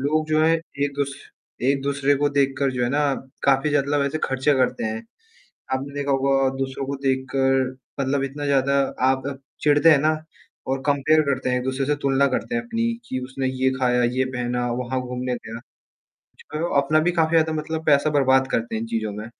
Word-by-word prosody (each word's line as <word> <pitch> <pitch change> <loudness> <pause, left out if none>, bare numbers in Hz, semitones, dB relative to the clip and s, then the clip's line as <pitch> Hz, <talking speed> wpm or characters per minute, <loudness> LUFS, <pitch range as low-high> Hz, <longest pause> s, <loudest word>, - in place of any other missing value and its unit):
लोग 155 +3 0
जो 155 0 +2
है 165 - +4 0.3
एक-दूस 140 -1 -2 0.5
एक-दूसरे 140 +1 +1
को 145 +1 +1
देख 140 -1 +1
कर 140 -1 +1
जो 125 -1 -2
है - - 0
ना, 145 -1 +1 0.3
काफ़ी 135 +2 +3
ज़्यादा 145 0 +1
लब 140 - +2
ऐसे 155 +3 -2
ख़र्चे 135 +2 +1
करते 130 -3 0
हैं। 110 0 -3 0.7
आपने 135 +2 -3
देखा 145 0 -2
होगा 135 0 +2
दूसरों 135 0 -3
को 140 +1 -3
देख 130 -1 +1
कर 135 0 +3 0.4
मतलब 135 0 0
इतना 140 +2 -4
ज़्यादा 140 0 +2 0.3
आप 130 0 0 0.4
चिढ़ते 145 +1 +5
हैं 150 - +6
ना 155 +1 +2 0.5
और 135 0 -1
कंपेयर 145 +2 +3
करते 140 -3 -1
हैं, 125 - +1
एक-दूसरे 130 +2 -2
से 150 +1 +1
तुलना 140 0 +3
करते 140 - -2
हैं 245 - 0
अपनी 230 0 -1
की 130 - -3
उसने 130 +1 -3
ये 130 0 +1
ख़ाया, 125 -1 +2
ये 125 +2 +1
पहना, 125 -1 -2
वहाँ 125 +1 -2
घूमने 125 0 -3
गया। 115 -1 -8 0.6
कुछ - - -23
करो 155 +3 -2
अपना 155 +3 +2
भी 175 +3 +1
काफ़ी 165 -2 +2
ज़्यादा 160 0 +3
मतलब 155 +1 -3
पैसा 145 +1 +4
बर्बाद 135 -2 +3
करते 115 0 -1
हैं 110 - -1
इन 115 - -4
चीज़ों 110 -2 -2
में, 105 +2 -7
135 Hz, 200 wpm, -23 LUFS, 130-145 Hz, 0.7 s, हैं